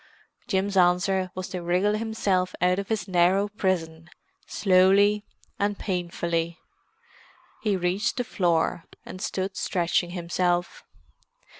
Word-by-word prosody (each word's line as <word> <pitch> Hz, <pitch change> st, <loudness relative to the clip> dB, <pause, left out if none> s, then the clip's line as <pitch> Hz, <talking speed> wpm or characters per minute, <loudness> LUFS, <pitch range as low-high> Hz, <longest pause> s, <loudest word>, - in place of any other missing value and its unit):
Jim's 195 Hz, -2 st, 0 dB
answer 185 Hz, +1 st, +3 dB
was 185 Hz, -1 st, -4 dB
to 180 Hz, -, -5 dB
wriggle 180 Hz, +5 st, +1 dB
himself 205 Hz, -4 st, -1 dB
out 180 Hz, +1 st, +2 dB
of 200 Hz, -, -4 dB
his 220 Hz, -2 st, -2 dB
narrow 185 Hz, +2 st, +3 dB
prison, 175 Hz, -5 st, -2 dB, 0.4 s
slowly 200 Hz, +2 st, +4 dB, 0.4 s
and 205 Hz, 0 st, 0 dB
painfully. 170 Hz, -2 st, -2 dB, 1.0 s
He 205 Hz, -3 st, +1 dB
reached 185 Hz, +8 st, -1 dB
the 245 Hz, -, 0 dB
floor, 170 Hz, -7 st, 0 dB, 0.2 s
and 185 Hz, +1 st, -9 dB
stood 190 Hz, -2 st, -3 dB
stretching 175 Hz, -1 st, 0 dB
himself. 175 Hz, 0 st, -1 dB
185 Hz, 115 wpm, -26 LUFS, 175-200 Hz, 1.0 s, slowly